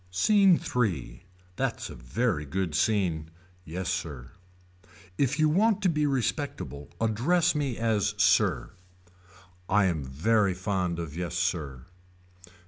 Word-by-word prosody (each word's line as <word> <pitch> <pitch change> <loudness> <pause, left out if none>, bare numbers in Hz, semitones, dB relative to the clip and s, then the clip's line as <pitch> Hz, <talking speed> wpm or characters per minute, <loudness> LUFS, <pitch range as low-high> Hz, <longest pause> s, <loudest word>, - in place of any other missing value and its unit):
SCENE 195 - +4 0.2
III. 85 - -1 0.3
That's - - -2
a - - -7
very 75 - -1
good 85 +3 -3
scene. 85 -3 0 0.3
Yes 90 +2 -5
sir. 75 -9 -4 0.9
If 140 -1 +1
you 155 -1 +4
want 205 +6 +2
to 185 - +4
be 150 -2 +1
respectable 115 - -3
address 145 +11 +2
me 140 -6 -2
as 105 -2 0
sir. 90 - +2 1.0
I 100 0 +4
am 85 -6 0
very 95 +9 +1
fond 90 -2 -1
of 80 -3 -6
yes 90 0 -4
sir. 80 -7 -2
95 Hz, 125 wpm, -27 LUFS, 80-125 Hz, 1.0 s, SCENE